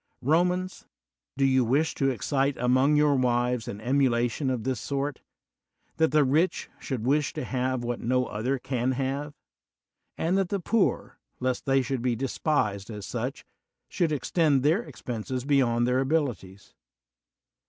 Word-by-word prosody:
Romans, 180 +6 +1 0.5
do 135 - +3
you 130 -1 +3
wish 140 +7 +1
to 135 - +1
excite 135 +2 0
among 130 +4 +3
your 150 -1 +4
wives 125 -2 +1
an 100 - -5
emulation 125 +1 +1
of 125 -4 -2
this 130 -1 -1
sort, 140 0 -3 0.8
that 160 0 +3
the 150 0 +4
rich 155 +7 +1
should 125 -5 -4
wish 145 +2 +1
to - - -4
have 130 -1 -1
what 120 0 -3
no 125 +1 +1
other 125 +5 -2
can 130 0 -1
have; 140 +3 -3 0.8
and 180 +4 +1
that 190 -2 0
the 200 - -1
poor, 205 +3 0 0.2
lest 130 +1 -2
they 135 0 +3
should 125 0 -2
be 125 -1 0
despised 120 -5 -1
as 105 -3 -7
such, - - -4 0.4
should 170 -3 0
extend 150 -2 +1
their 160 +9 +3
expenses 125 - -5
beyond 125 -5 +2
their 125 +1 +2
abilities? 125 - -2
130 Hz, 150 wpm, -27 LUFS, 125-145 Hz, 0.8 s, your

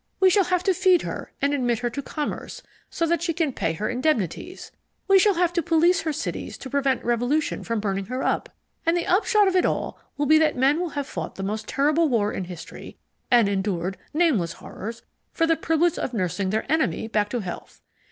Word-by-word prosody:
We 380 -1 +5
shall 395 0 +4
have 360 0 0
to 385 - +3
feed 370 -1 +3
her - - -6
and 285 +1 +2
admit 245 -4 +1
her 240 +1 -2
to 280 - -4
commerce 295 +2 -5 0.3
so 335 - -1
that 335 +1 +1
she 335 -1 0
can 315 -4 0
pay 165 -7 -1
her 210 +6 -3
indemnities 255 - -2 0.4
we 390 0 +6
shall 405 0 +4
have 350 0 +1
to 340 - +1
police 340 +4 +3
her 320 - -1
cities - - -4
to 260 - -9
prevent 275 -3 0
revolution 245 +6 0
from 230 -1 -2
burning 195 -2 -2
her 255 +1 -3
up - - 0 0.3
and 330 +1 +2
the 345 - -1
upshot 415 +2 +3
of 380 - +1
it 365 - +4
all - - -1 0.2
will 290 - 0
be 310 +2 +6
that 310 -4 +2
men 275 +5 +3
will 355 -1 -2
have 285 - -1
fought - - -6
the 195 - -5
most 215 +2 -3
terrible 300 +3 +2
war 215 -4 +1
in 190 - -3
history, 175 -2 -10 0.3
and 240 -4 +5
endured 190 -2 -1 0.2
nameless 285 - +2
horrors, 225 +7 -8 0.3
for 330 - +2
the 330 0 +3
privilege 325 +1 +1
of 250 - -3
nursing 185 -1 -1
their 215 +3 -1
enemy 315 -7 +1
back 210 -2 0
to 245 - -2
health. 180 -3 -8
285 Hz, 215 wpm, -24 LUFS, 215-335 Hz, 0.4 s, we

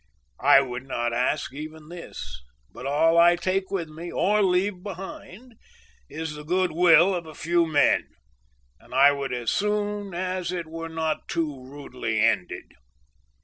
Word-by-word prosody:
I 135 - +7
would 130 0 -6
not 120 -2 -2
ask 125 +2 -1
even 155 +1 -9
this, 65 - -9 0.3
but 130 - -7
all 165 +4 +3
I 175 +1 +6
take 185 +2 -1
with 180 -5 -2
me, 165 +3 -8
or 210 +3 +2
leave 185 0 +1
behind, 200 +4 -9 0.6
is 160 0 -5
the 150 0 -9
good 180 +3 0
will 170 +2 +5
of 170 -3 -4
a 155 - -11
few 170 +2 +1
men, 145 -2 +3 0.7
and - - -12
I 140 +2 +7
would 140 -1 -3
as 120 -2 -2
soon 205 -2 -1
as 185 -1 -2
it 175 -2 -3
were 165 +1 -7
not 160 -1 -3
too 150 -6 -3
rudely 125 -5 -4
ended. 110 -5 0
165 Hz, 155 wpm, -25 LUFS, 140-185 Hz, 0.7 s, I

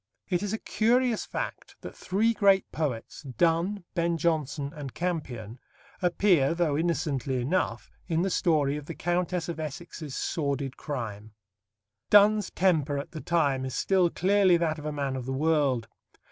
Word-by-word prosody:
It 180 -2 +1
is 205 -1 -2
a 220 - -1
curious 235 +1 +1
fact - - -5
that - - -9
three 215 +5 +1
great 200 -2 +3
poets 140 -8 -3
Donne, 165 - 0
Ben 170 -1 0
Jonson, 150 -3 -1
and 145 -5 -8
Campion 130 -10 -4 0.4
appear, 175 -5 +3
though 165 -4 +1
innocently 145 -5 -1
enough, 125 -3 -1 0.2
in 165 -1 +1
the 195 - 0
story 150 -6 +2
of 150 -1 -9
the - - -6
Countess 175 0 -1
of 170 -2 -5
Essex's 155 -1 -6
sordid 140 -3 -2
crime. 110 -8 -6 0.8
Donne's 210 0 +5
temper 155 -6 +1
at 140 - -5
the 155 - -7
time 145 -6 +1
is 130 -1 -4
still 185 -3 +2
clearly 190 0 +3
that 160 -2 -1
of 150 - -6
a - - -2
man 140 -2 -2
of 130 -1 -5
the 135 - -2
world. 140 -5 +1
160 Hz, 160 wpm, -28 LUFS, 140-180 Hz, 0.8 s, Donne's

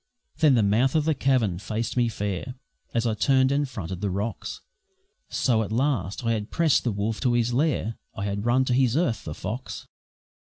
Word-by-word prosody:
Then 150 -5 +5
the 115 - +3
mouth 115 +8 +2
of 155 -2 +2
the 160 - +3
cavern 125 - +1
faced 110 +2 -3
me 120 -1 +3
fair, 105 +3 -4 0.4
As 115 0 0
I 115 - +1
turned 130 +4 +3
and 140 0 +1
fronted 95 -5 -6
the 100 - 0
rocks; 100 +5 -4 0.7
So, 115 -4 +1
at 110 - -4
last, 115 - -1
I 115 - +2
had 105 -1 -2
pressed 165 -4 +2
the 120 - 0
wolf 105 +2 -2
to 125 -3 +2
his 120 0 +1
lair, 130 -5 0 0.2
I 100 - -3
had 100 0 -2
run 130 +2 +3
to 125 - 0
his 130 0 +3
earth 130 -10 0
the - - -5
fox. - - -5
115 Hz, 200 wpm, -25 LUFS, 105-130 Hz, 0.7 s, Then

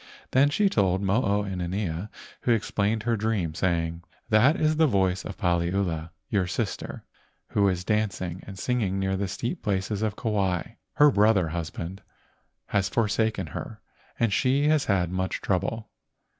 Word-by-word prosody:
Then 140 +2 +5
she 200 +7 +2
told 95 - +1
Mo 100 +5 +2
o 105 -2 +1
inanea, 95 0 -3 0.3
who 120 - +1
explained 110 0 0
her 115 0 +1
dream, 105 -7 -1
saying: 85 -1 -1 0.3
"That 120 +8 +5
is 155 0 +2
the 160 -1 +5
voice 95 -5 +1
of 100 - -7
Paliula, 85 -3 0 0.2
your 95 -4 +1
sister, 85 - -3 0.5
who 100 -1 +3
is 90 -1 -2
danc¬ 105 -2 0
ing 90 0 -5
and 95 -1 -8
singing 105 -3 0
near 95 0 0
the 100 +1 -1
steep 120 - -4
places 100 0 -1
of 110 -2 -1
Kauai. 100 -6 0 0.3
Her 145 0 +6
brother 100 -6 +3
husband 85 +3 -5 0.7
has 100 -1 +1
forsaken 110 -2 +1
her - - -6 0.4
and 115 -3 +2
she 135 +6 +2
has 155 -2 +3
had 90 -4 +1
much 95 0 -2
trouble. 105 +4 -2
100 Hz, 155 wpm, -26 LUFS, 90-110 Hz, 0.7 s, Her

